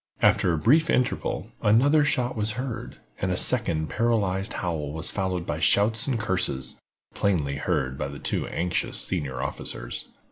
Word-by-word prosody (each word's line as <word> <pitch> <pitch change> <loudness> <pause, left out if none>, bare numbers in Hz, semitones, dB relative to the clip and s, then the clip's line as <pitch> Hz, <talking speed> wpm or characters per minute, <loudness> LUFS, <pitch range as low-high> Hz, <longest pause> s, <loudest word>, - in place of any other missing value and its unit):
After 90 - +4
a 85 - 0
brief 155 - +3
interval, 125 0 -1
another 140 +9 +4
shot 125 -4 0
was 105 -1 +1
heard, 125 0 -5 0.2
and 95 - -1
a 90 - 0
second 85 -12 +3
paralyzed 100 -5 0
howl 80 -5 -3
was 80 0 -1
followed 95 -3 -2
by 75 - -3
shouts 110 - +3
and 125 -4 0
curses, 90 - 0 0.3
plainly 75 -9 0
heard 65 -1 -1
by 70 - -2
the 70 +1 -8
two - - -2
anxious 90 +1 -1
senior 70 -8 -2
officers. - - -5
95 Hz, 155 wpm, -25 LUFS, 80-115 Hz, 0.3 s, After